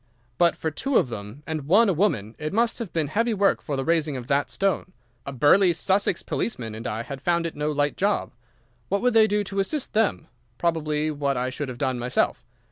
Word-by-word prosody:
"But 170 Hz, -1 st, +4 dB
for 160 Hz, -, -3 dB
two 275 Hz, -, 0 dB
of 130 Hz, -, +2 dB
them, 110 Hz, +5 st, -8 dB
and 155 Hz, -3 st, -4 dB
one 215 Hz, +8 st, +5 dB
a 195 Hz, -, +3 dB
woman, 120 Hz, -, 0 dB
it 155 Hz, +2 st, -4 dB
must 230 Hz, +3 st, +1 dB
have 230 Hz, -6 st, -5 dB
been 160 Hz, -2 st, 0 dB
heavy 230 Hz, +7 st, +1 dB
work 200 Hz, 0 st, +2 dB
the 135 Hz, -3 st, -3 dB
raising 160 Hz, -4 st, +1 dB
of 125 Hz, -, -7 dB
that 140 Hz, -2 st, +1 dB
stone. 185 Hz, +6 st, -1 dB, 0.3 s
A -, -, -3 dB
burly 170 Hz, +8 st, +4 dB
Sussex 190 Hz, +1 st, +1 dB
policeman 115 Hz, -, -3 dB
and 110 Hz, +2 st, -6 dB
I 110 Hz, +2 st, -3 dB
had 135 Hz, +1 st, -7 dB
found 170 Hz, +1 st, +1 dB
it 165 Hz, -, -4 dB
no 150 Hz, +1 st, -1 dB
light 145 Hz, 0 st, 0 dB
job. 200 Hz, +1 st, 0 dB, 0.6 s
What 200 Hz, +3 st, 0 dB
would 250 Hz, -, +3 dB
they 220 Hz, -1 st, +6 dB
do 210 Hz, 0 st, +1 dB
to 195 Hz, 0 st, -4 dB
assist 275 Hz, +8 st, -2 dB
them? 215 Hz, -6 st, +1 dB, 0.3 s
Probably 155 Hz, -2 st, 0 dB
what 140 Hz, -2 st, -1 dB
I 125 Hz, +1 st, -1 dB
should 145 Hz, 0 st, -4 dB
have 125 Hz, -, -7 dB
done 130 Hz, -2 st, -1 dB
myself. 125 Hz, +1 st, 0 dB
155 Hz, 215 wpm, -25 LUFS, 140-195 Hz, 0.6 s, they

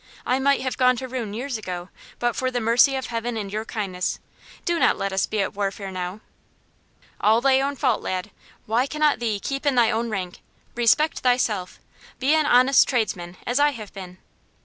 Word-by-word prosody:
"I 255 Hz, +1 st, +1 dB
might 280 Hz, +1 st, +2 dB
have 260 Hz, +1 st, -3 dB
gone 255 Hz, 0 st, +5 dB
to 260 Hz, +2 st, -5 dB
ruin 245 Hz, -5 st, -4 dB
years 250 Hz, 0 st, -3 dB
ago, 180 Hz, -3 st, -6 dB, 0.3 s
but 240 Hz, -1 st, 0 dB
for 255 Hz, -, 0 dB
the 250 Hz, -1 st, -2 dB
mercy 240 Hz, +4 st, +4 dB
of 265 Hz, -1 st, -3 dB
Heaven 230 Hz, 0 st, -3 dB
and 200 Hz, -2 st, -5 dB
your 215 Hz, +1 st, -3 dB
kindness. 195 Hz, -5 st, -3 dB, 0.5 s
Do 345 Hz, -1 st, +1 dB
not -, -, +3 dB
let 195 Hz, 0 st, -2 dB
us 190 Hz, -, +1 dB
be 215 Hz, -1 st, -1 dB
at -, -, -4 dB
warfare 195 Hz, -1 st, -3 dB
now." 185 Hz, +2 st, -5 dB, 1.0 s
"All 220 Hz, +2 st, +4 dB
thy 265 Hz, +1 st, +3 dB
own 280 Hz, +1 st, -1 dB
fault, 255 Hz, -5 st, +1 dB
lad. 185 Hz, +2 st, -3 dB, 0.3 s
Why 235 Hz, +5 st, +1 dB
cannot 300 Hz, 0 st, +1 dB
thee 220 Hz, -4 st, -1 dB
keep 275 Hz, +6 st, -4 dB
in 285 Hz, -3 st, +2 dB
thy 235 Hz, -2 st, +4 dB
own 230 Hz, +2 st, -1 dB
rank? 185 Hz, -4 st, -4 dB, 0.3 s
Respect 240 Hz, +7 st, +2 dB
thyself. 225 Hz, -7 st, 0 dB, 0.4 s
Be 270 Hz, +3 st, +2 dB
an 310 Hz, -1 st, +3 dB
honest 255 Hz, +1 st, +5 dB
tradesman, 185 Hz, -8 st, -2 dB
as 245 Hz, +3 st, 0 dB
I 290 Hz, 0 st, +4 dB
have 215 Hz, -5 st, -9 dB
been." 185 Hz, -2 st, -9 dB
235 Hz, 195 wpm, -23 LUFS, 200-260 Hz, 1.0 s, gone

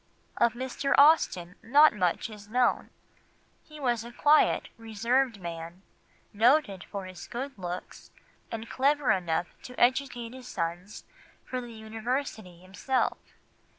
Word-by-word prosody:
Of 235 Hz, -, +3 dB
Mr. 260 Hz, +2 st, -1 dB
Austen 240 Hz, -, +4 dB
not 290 Hz, +5 st, +6 dB
much 180 Hz, -5 st, 0 dB
is 210 Hz, -1 st, -12 dB
known; 245 Hz, +2 st, +1 dB, 0.7 s
he 305 Hz, -1 st, -13 dB
was 240 Hz, -5 st, 0 dB
a 235 Hz, -, -9 dB
quiet, 295 Hz, +5 st, +3 dB
reserved 230 Hz, +2 st, 0 dB
man, 170 Hz, +1 st, -7 dB, 0.5 s
noted 220 Hz, -3 st, +3 dB
for 200 Hz, -2 st, -6 dB
his 185 Hz, -2 st, -10 dB
good 270 Hz, +3 st, -5 dB
looks, 180 Hz, -1 st, -7 dB, 0.4 s
and 230 Hz, 0 st, -5 dB
clever 280 Hz, +2 st, +2 dB
enough 175 Hz, -2 st, 0 dB
to 250 Hz, -, -10 dB
educate 245 Hz, -2 st, +1 dB
his 255 Hz, -1 st, -11 dB
sons 175 Hz, +3 st, -4 dB, 0.4 s
for 255 Hz, -1 st, -4 dB
the 240 Hz, -1 st, -9 dB
University 220 Hz, -3 st, -4 dB
himself. 200 Hz, +8 st, -1 dB
230 Hz, 125 wpm, -28 LUFS, 190-260 Hz, 0.7 s, not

